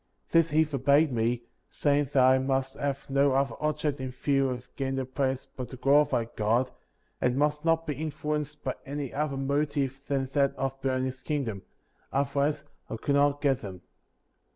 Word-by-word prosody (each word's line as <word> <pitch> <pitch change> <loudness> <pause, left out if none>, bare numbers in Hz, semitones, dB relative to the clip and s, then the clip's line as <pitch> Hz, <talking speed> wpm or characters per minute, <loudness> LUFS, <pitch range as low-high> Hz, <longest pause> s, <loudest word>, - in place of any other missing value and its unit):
This 165 -1 +4
he 155 +1 +4
forbade 145 +1 +3
me, 120 0 0 0.3
saying 145 0 +2
that 130 -2 +5
I 130 0 +6
must 135 0 -1
have 140 -1 -2
uq 140 -1 +3
other 135 - -7
object 150 -1 0
in 130 - -3
view 135 +1 +1
in 125 -1 -4
getting 135 -1 -2
the 135 -1 -1
plates 130 0 -1
but 125 -2 -5
to 130 - -9
glorify 140 -2 +3
God, 115 +4 +1 0.5
and 125 +1 +2
must 150 +1 +1
not 165 0 +2
be 150 - -1
influenced 150 -1 -3
by 130 - -1
any 140 -1 -5
other 145 -1 -1
motive 140 -1 -1
than 135 -1 0
that 140 -2 +2
of 135 0 -3
building 130 -1 0
his 130 0 -5
kingdom; 130 -9 -2 0.5
otherwise 140 +2 0 0.3
I - - -3
could 140 - -1
not 145 0 +3
get 135 -2 +2
them. 95 -4 -8
140 Hz, 175 wpm, -28 LUFS, 130-145 Hz, 0.5 s, I